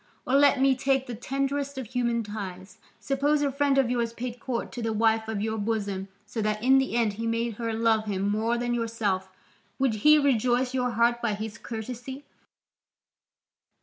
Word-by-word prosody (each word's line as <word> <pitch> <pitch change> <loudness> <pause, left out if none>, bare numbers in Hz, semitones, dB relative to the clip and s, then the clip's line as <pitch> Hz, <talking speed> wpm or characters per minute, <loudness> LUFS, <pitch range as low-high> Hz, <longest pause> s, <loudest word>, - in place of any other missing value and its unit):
Or 255 - -2
let 280 -1 +5
me 270 0 +5
take 270 0 +1
the 245 - -6
tenderest 275 +3 -2
of 260 - -4
human 235 0 -1
ties: 195 -1 -7 0.2
suppose 285 +2 +1
a 280 - +1
friend 280 0 +1
of 260 -3 +3
yours 235 -2 -1
paid 245 0 -5
court 240 -3 -3
to 245 - -6
the 225 -1 -1
wife 220 0 +2
of 215 -2 -2
your 220 0 -2
bosom 200 -3 -2 0.2
so 225 - -4
that 215 +1 -1
in 265 +1 +6
the 265 -3 -1
end 230 -3 +2
he 225 +3 -4
made 230 -1 -1
her 230 -1 -2
love 220 -1 +2
him 200 -1 -1
more 220 +3 +1
than 240 0 -1
yourself, 225 -5 -1 0.5
would 265 -4 +2
he 300 +4 +7
rejoice 255 -2 +2
your 250 -1 0
heart 235 +1 +2
by 225 -3 0
his 220 +2 -6
courtesy? 250 +4 -7
235 Hz, 185 wpm, -27 LUFS, 220-265 Hz, 0.5 s, he